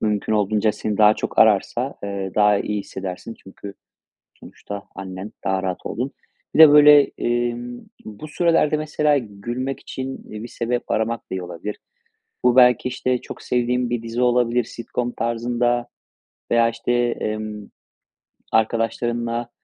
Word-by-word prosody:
mümkün 105 0 -1
olduğunca 105 0 +2
seni 105 -1 -4
daha 105 0 +6
çok - - -5
ararsa, 115 +5 +3
eee, 100 -1 -4
daha 105 -1 +4
iyi 105 0 -2
hissedersin. 95 +3 -7
Çünkü 100 +1 -10 0.7
sonuçta 100 -1 -9
annen 95 +1 -7
daha 95 0 0
rahat 95 -1 -4
olduğun. 130 +5 -3 0.4
Bir - - -1
de, 155 -2 +11
böyle, 150 0 +8 0.2
emm, 120 0 -2 0.2
bu 110 +8 -9
sürelerde, 160 -1 +2
mesela, 150 -1 +1
gülmek 120 +4 -5
için 130 0 -6
bir 110 +3 -7
sebep 120 +2 -3
aramak 110 +1 0
da - - -51
iyi 95 -1 -3
olabilir. 90 +4 -6 0.7
Bu 125 0 +4
belki, 125 -1 +5
işte, 125 0 -1
çok - - -10
sevdiğin 125 0 0
bir 120 -1 -2
dizi 115 +2 -3
olabilir, 125 -1 +2
sitcom 120 +2 -4
tarzında 120 +1 -1 0.6
veya, 115 0 +4
işte, 115 +1 -3
emm, 110 -3 -2 0.8
arkadaşlarınla 115 +1 0
115 Hz, 140 wpm, -22 LUFS, 105-125 Hz, 0.8 s, de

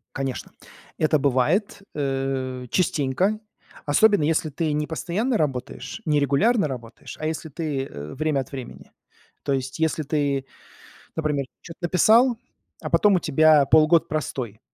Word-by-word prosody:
Конечно, 135 -2 -4 0.4
это 155 -1 +2
бывает, 145 - +1
э, 135 -2 -2
частенько, 180 +4 +1 0.5
особенно 205 +5 +4
если 155 +1 +1
ты 155 +2 -2
не 150 0 -1
постоянно 205 +9 -1
работаешь, 140 - -3
не 150 -2 +2
регулярно 155 - +2
работаешь, 120 -3 -8
а 155 - -2
если 160 0 -4
ты, 145 -2 -3
э, 75 - -8
время 155 0 0
от 130 - -6
времени. 130 -3 -9 0.5
То 140 - -2
есть, 130 -1 -2
если 160 -1 0
ты, 140 -2 -1 0.7
например, 150 -3 -1 0.2
чё-то 165 - -11
написал, 225 +8 +4 0.4
а - - -4
потом 205 -2 +4
у - - +3
тебя 155 -1 +5
полгода 155 +3 +5
простой, 130 -8 -4
150 Hz, 140 wpm, -24 LUFS, 135-165 Hz, 0.7 s, тебя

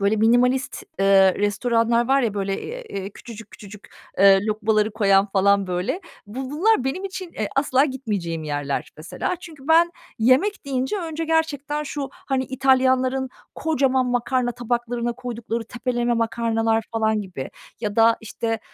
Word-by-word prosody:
böyle, 200 +2 +2
minimalist, 245 +4 +2 0.2
ııı, 195 -1 +5
restoranlar 230 +3 +1
var 275 0 +4
ya, 220 -4 -1
böyle, 195 -1 -2 0.2
eee, 195 - -6
küçücük 225 0 -11
küçücük, 205 0 -13 0.3
eee, 195 0 +7
lokmaları 215 0 +1
koyan 200 -2 +3
falan, 200 0 +3
böyle. 180 - -2 0.3
Bu 255 +5 -6
bunlar 325 - +2
benim 360 +9 -2
için, 375 -2 -6
eee, 215 -2 -3
asla 275 0 +3
gitmeyeceğim 205 - -3
yerler 145 -2 -3
mesela. 160 - -4
Çünkü 310 -5 -12
ben 335 +1 +5 0.3
yemek 260 - +2
deyince 265 +5 -1
önce 325 -3 -4
gerçekten 300 -2 0
şu, 285 -1 -4
hani 265 -1 -2
İtalyanların 260 0 +2 0.3
kocaman 265 -5 +1
makarna 245 0 0
tabaklarına 240 0 -2
koydukları 235 -2 -5
tepeleme 240 +1 -2
makarnalar 225 -1 0
falan 220 -1 +1
gibi 180 -9 -7 0.3
ya 210 -2 -3
da, 225 0 +5
işte, 225 0 -3
235 Hz, 140 wpm, -23 LUFS, 210-265 Hz, 0.3 s, eee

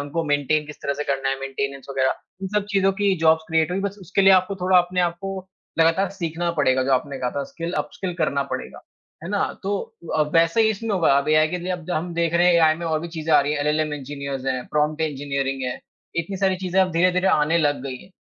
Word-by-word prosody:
उनको 145 +3 -3
मेंटेनें 145 +1 +1
किस 150 - -9
तरह 140 - 0
से 150 +1 -4
करना 135 -1 -1
है, 135 0 -1
मेंटेनेंस 135 0 -4
वगैरह, 130 -1 +1 0.3
इन 190 - -2
सब 210 -1 +2
चीज़ों 195 -1 +3
की 200 -1 +3
जॉब्स 160 0 +5
क्रिएट 160 0 +2
हुई। 190 - -1
बस 200 +1 -3
उसके 190 +2 -1
लिए 195 - +7
आपको 185 +1 +3
थोड़ा 185 0 +5
अपने 180 +1 +1
आप 175 -1 0
को 195 0 -4 0.4
लगातार 165 +4 +3
सीखना 170 -2 -3
पड़ेगा। 130 -1 +3
जो 135 - +1
आपने 135 +1 0
कहा 125 -1 -1
था 140 - 0
स्किल, 170 +1 -5
अपस्किल 185 -2 -3
करना 140 0 +1
पड़ेगा। - - -6 0.4
है - - -5
ना? 205 -1 +1 0.2
तो 200 +1 -1 0.4
अ, 155 - +4
वैसा 165 +6 +4
ही 220 - +4
इसमें 220 +2 -4
होगा 170 -7 +3
अब 140 - -2
एआई 155 0 +4
के 180 +1 -3
लिए 180 +1 -3
अब 175 -3 -5
द - - -6
हम 175 +1 -2
देख 170 0 0
रहे 175 +1 +4
हैं 180 - +5
एआई 160 -2 +5
में 170 0 -5
और 155 -1 0
भी 170 - -6
चीज़ें 160 -1 -3
आ - - +7
रही 145 +1 -1
हैं। 150 - -1
एलएलएम 150 +1 0
इंजीनियर्स 140 -1 -6
हैं, 130 -1 -2
प्रॉम्प्ट 150 +1 0
इंजीनियरिंग 140 -3 -2
है। 125 0 -3 0.4
इतनी 170 +4 -2
सारी 190 -1 +1
चीज़ें 185 0 0
अब 185 -1 +2
धीरे-धीरे 180 +2 +2
आने 150 +1 +3
लग 145 -3 +1
गई 135 -2 -5
हैं 190 - -18
160 Hz, 250 wpm, -23 LUFS, 145-180 Hz, 0.4 s, लिए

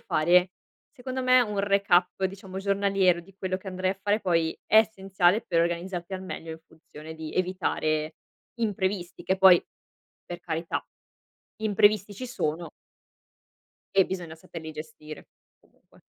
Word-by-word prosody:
fare, 175 +4 +3 0.4
secondo 260 -1 -5
me 255 0 +6
un 210 -4 -1
recap 195 -2 +2
diciamo 190 0 -5
giornaliero, 195 -2 +2
di 185 +2 -19
quello 185 -1 -2
che 190 - -9
andrei 185 0 -1
a 195 - -17
fare, 205 +1 +2
poi 165 -4 +1
è 215 - +6
essenziale 195 -2 +2
per 165 - +2
organizzarti 175 +2 -2
al 185 - -6
meglio, 165 -3 -7
in 160 - -7
funzione 160 0 -12
di 160 -1 -7
evitare 155 -4 -1 0.4
imprevisti, 190 -5 -2
che 190 - 0
poi, 185 -2 +7 0.6
per 175 - -7
carità 165 0 -3 0.7
imprevisti 205 -1 +3
ci 255 +6 -6
sono 170 - -3 1.3
e 195 -1 +6
bisogna 175 -4 -5
saperli 160 0 -9
gestire, 155 0 -10 0.3
comunque. - - -27
185 Hz, 135 wpm, -27 LUFS, 170-200 Hz, 1.3 s, poi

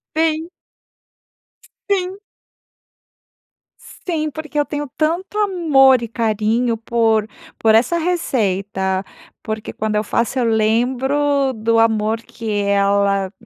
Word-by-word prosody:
Sim. 320 +1 0 1.4
Sim. 380 -1 -1 1.6
Sim, 315 -4 -4
porque 305 0 -5
eu 290 - +2
tenho 295 -1 -4
tanto 340 +6 -1
amor 310 - +4
e 235 - -4
carinho 225 +1 0
por 225 -1 +1 0.3
por 220 -1 +3
essa 245 +10 +3
receita, 200 - -1 0.4
porque 215 0 -5
quando 215 0 -3
eu 210 - +1
faço 235 +4 -1
eu 250 - +2
lembro 260 +5 +1
do 225 +1 +1
amor 220 0 +1
que 230 -1 -7
ela 200 -1 +1
235 Hz, 105 wpm, -19 LUFS, 215-300 Hz, 1.6 s, amor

